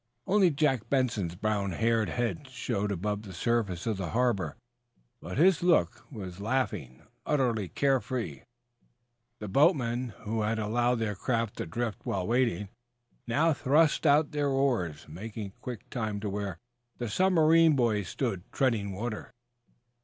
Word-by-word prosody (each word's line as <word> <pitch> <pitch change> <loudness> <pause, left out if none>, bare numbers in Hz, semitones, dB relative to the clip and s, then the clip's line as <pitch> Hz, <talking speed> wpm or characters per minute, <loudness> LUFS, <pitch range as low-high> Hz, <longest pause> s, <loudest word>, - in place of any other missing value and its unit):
Only 195 -2 +4
Jack 135 -7 0
Benson's 115 -10 0
brown 100 -1 -1
haired 115 +2 +1
head 120 - -2
showed 110 -5 -2
above 105 +2 -2
the 100 -3 -10
surface 100 -4 0
of 110 -3 -1
the 95 -3 -3
harbor, 120 -5 0 0.6
but - - -6
his 175 +2 +5
look 175 -2 +2
was 95 -7 -7
laughing, 105 - -2 0.2
utterly 120 -9 +1
care 135 - +2
free. 110 - -4 1.0
The 105 - -6
boatmen 125 - +2
who 110 +1 -1
had 110 +1 0
allowed 120 +3 +1
their 115 -3 -1
craft 115 +1 -1
to - - -4
drift 115 +5 -3
while 95 -2 -2
waiting, 115 -5 +1 0.6
now 155 +7 +3
thrust 150 +3 +3
out 145 +1 +4
their 145 -2 0
oars, 120 - 0
making 100 +5 -7
quick 120 -4 -7
time 110 -4 -2
to 105 -2 -3
where 100 -3 -3 0.4
the 120 - -3
submarine 165 - +4
boy 115 -5 +2
stood 100 0 -4
treading 110 -7 0
water. 110 +3 -5
115 Hz, 145 wpm, -29 LUFS, 100-135 Hz, 1.0 s, his